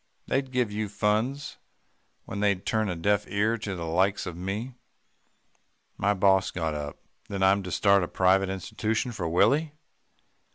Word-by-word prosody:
They'd 135 -1 -1
give 125 -4 0
you 105 0 -3
funds, 110 +8 -1 0.7
when 100 - -5
they'd 100 -2 +1
turn 110 -2 0
a 90 - -2
deaf 100 +4 +1
ear 105 +3 +1
to 100 -2 -4
the 85 -2 -5
likes 95 +5 +1
of 90 -2 -5
me.' 100 +8 -4 1.2
"My 100 +1 +1
boss 95 0 +3
got 80 -3 -2
up. 75 -1 -5 0.3
'Then 100 -1 -2
I'm 95 +1 +4
to 90 -2 -7
start 100 +2 +4
a 90 - -1
private 95 +2 +3
institution 110 +5 -2
for 90 -8 -3
Willie? 140 - +3
100 Hz, 160 wpm, -27 LUFS, 95-110 Hz, 1.2 s, I'm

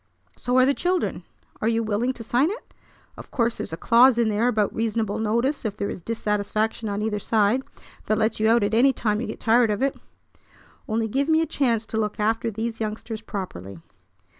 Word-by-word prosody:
So 250 +1 -1
are 255 - +6
the 280 - +3
children. 360 +4 -1 0.4
Are 215 - +1
you 230 0 +1
willing 220 +4 0
to 235 - -9
sign 245 +7 +2
it? 430 +5 -8 0.4
Of - - -11
course 235 -2 0
there's - - -5
a 160 - -4
clause 240 +4 +5
in 235 -2 +2
there 215 +3 +1
about 215 -4 +1
reasonable 225 -2 -1
notice 235 +6 0
if 210 -2 -3
there 200 - -2
is - - -7
dissatisfaction 215 +1 -2
on 205 +1 -2
either 210 -1 -1
side; 215 +4 +2 0.5
that 215 - +2
lets 220 +1 0
you 220 +1 +3
out 230 -1 +4
at 205 +1 0
any 260 +4 +5
time 215 -3 -1
you 245 - -3
get 215 - -6
tired 230 0 +3
of 210 +5 -1
it. 275 - +1 0.9
Only 220 +1 0
give 275 +7 -1
me 320 0 +4
a - - +1
chance 240 -7 0
to 220 - -4
look 210 -1 -2
after 225 +2 +1
these 225 +1 -4
youngsters 220 +1 -4
properly." 100 - -6
225 Hz, 210 wpm, -24 LUFS, 210-240 Hz, 0.9 s, are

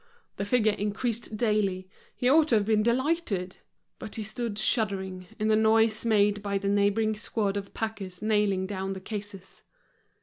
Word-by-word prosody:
The 200 - -2
figure 220 0 +3
increased 215 +2 -3
daily, 205 -5 0 0.3
he 250 - 0
ought 305 +4 +5
to 240 - +3
have 210 -2 +2
been 215 0 +3
delighted. 235 - 0 0.4
But 215 - -8
he 220 - -4
stood 215 0 -4
shuddering, 195 -5 -1
in 215 - -1
the 215 - +4
noise 220 0 +3
made 205 -2 +3
by 200 -1 -1
the 200 0 -2
neighboring 205 +2 +2
squad 210 -1 -1
of 200 -1 -5
packers 200 -5 -4
nailing 210 -3 +1
down 195 0 -3
the 190 - -6
cases. 200 -1 -8
210 Hz, 165 wpm, -28 LUFS, 200-220 Hz, 0.4 s, ought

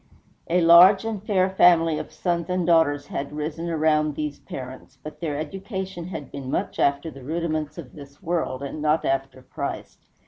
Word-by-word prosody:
A 175 +1 +3
large 175 +5 +7
and 220 -3 -3
fair 190 -3 +2
family 165 -4 +4
of - - -7
sons 170 +1 -2
and 180 -1 0
daughters 160 -4 +3
had 140 +1 -5
risen 155 +3 -4
around 155 -2 +1
these 150 -1 -4
parents; 130 +1 -9
but 155 - -9
their 155 -4 -3
education 190 +2 -5
had 160 -7 -7
been 135 -2 -7
much - - -2
after 140 +3 +1
the 135 -1 -12
rudiments 155 0 -3
of 145 -7 -9
this 140 -1 -13
world, 165 -7 -2
and 140 +2 -6
not 155 +1 +1
after 135 -1 -2
Christ. - - -6
155 Hz, 175 wpm, -24 LUFS, 145-175 Hz, -, large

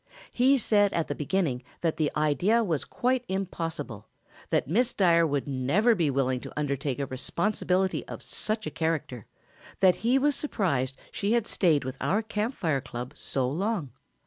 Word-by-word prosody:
"He 265 +3 +4
said 205 -4 +3
at 165 - -1
the - - 0
beginning 150 -5 -1 0.2
that 165 -2 0
the 155 -2 +1
idea 175 - +3
was 165 -9 -1
quite 255 0 0
impossible, 165 - -4 0.4
that - - +1
Miss 235 - +1
Dyer 170 -4 +4
would 145 -2 -1
never 145 - +2
be 170 -8 +1
willing 130 -2 +1
to - - -9
undertake 140 -2 -1
a 140 - -1
responsibility 185 +7 0
of - - -8
such 215 0 -2
a - - -3
character, 155 -8 -2 0.5
that 185 -2 +5
he 245 +4 +2
was 290 +2 +3
surprised 140 - -1
she 205 +2 0
had 235 -3 +2
stayed 165 -9 +2
with 130 +1 -5
our 210 +3 +1
Camp 220 +3 -2
Fire 155 -6 0
club 125 +1 -7
so 135 -2 -2
long. 175 - -2
170 Hz, 170 wpm, -28 LUFS, 140-210 Hz, 0.5 s, that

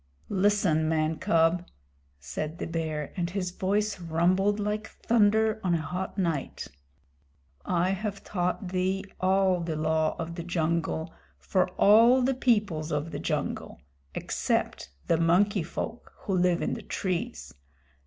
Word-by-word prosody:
"Listen, 190 -6 +2
man 155 0 +1
cub," 165 +2 +2 0.5
said 155 - -5
the - - -4
Bear, 160 -3 -3
and 170 -2 -1
his 180 -1 -3
voice 200 +2 -1
rumbled 180 +5 +1
like 210 +1 -2
thunder 220 -1 +2
on 180 -2 +2
a 165 - -1
hot 180 +6 -4
night. 165 - -2 1.0
"I 180 +1 +1
have 200 +1 -4
taught 180 0 -2
thee 185 +1 0 0.2
all 190 -1 +3
the 165 -2 -3
Law 155 0 +1
of 165 -1 -4
the 170 0 -5
Jungle 165 -1 -1 0.2
for 185 -2 0
all 230 +5 +6
the 265 +2 +2
peoples 210 -11 +1
of 150 +2 -2
the - - -4
jungle - - -3 0.4
except - - -1 0.2
the 165 - +2
Monkey 185 +5 +3
Folk 200 +8 -6
who 195 - -1
live 180 -1 +2
in - - -1
the - - -5
trees. 195 +6 -3
180 Hz, 140 wpm, -28 LUFS, 165-205 Hz, 1.0 s, all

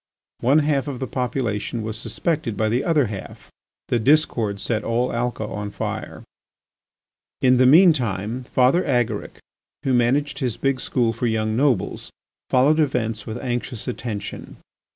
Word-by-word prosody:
One 135 +5 +3
half 145 -2 +1
of 140 -3 -4
the 130 - -2
population 120 -4 -2
was 110 0 -4
suspected 125 - -2
by 110 +1 +1
the 120 +4 0
other 155 -5 +3
half. 100 -3 -8 0.4
The 120 - +2
discord 115 -6 +2
set 110 +2 -1
all 120 +2 0
Alca 120 -1 -2
on 105 0 -5
fire. - - -5 1.2
In 130 -1 +5
the 130 0 +5
mean 170 +5 +7
time 115 -1 -3
Father 130 +9 +3
Agaric, 120 -6 -1 0.5
who 135 -3 +1
managed 140 +4 +1
his 125 -4 -2
big 135 +2 0
school 120 -3 0
for 120 +2 -2
young 110 -1 0
nobles, 130 -6 0 0.4
followed 145 +5 +4
events 115 -7 -1
with 110 +1 -4
anxious 120 -2 -3
attention. 115 -4 -5
125 Hz, 150 wpm, -22 LUFS, 110-135 Hz, 1.2 s, mean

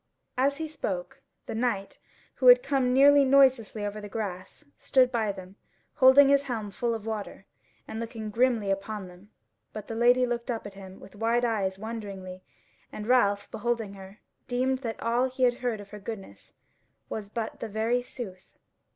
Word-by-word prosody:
As 275 +2 +1
he 320 0 -3
spoke 190 - -5 0.2
the - - -5
knight, 220 -4 -2 0.3
who 255 - 0
had 245 0 +9
come 270 -3 +1
nearly 280 +2 +6
noiselessly 260 -6 +3
over 205 +1 -5
the 205 - -8
grass, 200 +4 -6
stood 255 -2 +3
by 220 -4 0
them, 190 0 -11 0.4
holding 265 +1 +7
his 280 0 +4
helm 220 -6 -4
full 235 +3 -1
of 220 -1 -7
water, 210 -3 -5 0.4
and 220 - -6
looking 225 -2 -5
grimly 230 -3 +2
upon 195 0 -4
them; 180 +3 -16 0.4
but 215 -1 -7
the - - -5
Lady 245 +2 +4
looked 240 0 -3
up 230 -3 -3
at 205 - -8
him 190 -1 -11
with - - -14
wide 230 +3 +1
eyes 195 -5 -1
wonderingly, 195 -4 -7 0.5
and 210 - -7
Ralph, 205 -5 +3
beholding 225 -2 -2
her, 195 +1 -12 0.3
deemed 255 +1 0
that 230 -4 -5
all 240 +3 +1
he 255 0 -3
had 245 -1 +3
heard 245 -4 -2
of 205 -1 -12
her 210 - -8
goodness 200 -1 -9 0.5
was 210 -2 -6
but 225 0 -5
the 230 - -5
very 225 +4 0
sooth. 200 -7 -10
225 Hz, 175 wpm, -27 LUFS, 200-250 Hz, 0.5 s, had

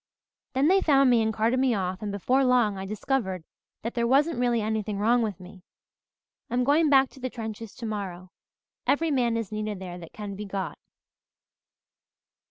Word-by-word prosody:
Then 265 +3 +3
they 385 +3 +5
found 275 -5 +4
me 235 -2 +4
and 220 0 +1
carted 225 +3 +1
me 260 -3 +2
off 185 0 -2
and 210 -1 -3
before 250 +7 +1
long 245 -5 +3
I 190 0 -6
discovered 205 -4 -2 0.4
that 230 - -3
there 235 -1 0
wasn't 285 +3 +3
really 240 -1 +2
anything 215 -1 -2
wrong 235 +4 +3
with 210 -5 -2
me. 185 +1 -13 0.9
I'm 245 +1 +1
going 295 +4 +3
back 270 -2 +5
to - - -15
the 255 0 -3
trenches 225 -2 -7
tomorrow. 195 -5 -5 0.6
Every 320 +2 +2
man 240 -4 +1
is 225 -3 -4
needed 215 -1 -3
there 180 -1 -7
that 165 -2 -11
can 205 -2 -7
be 210 +2 -6
got." 195 -2 -4
225 Hz, 180 wpm, -27 LUFS, 200-255 Hz, 0.9 s, they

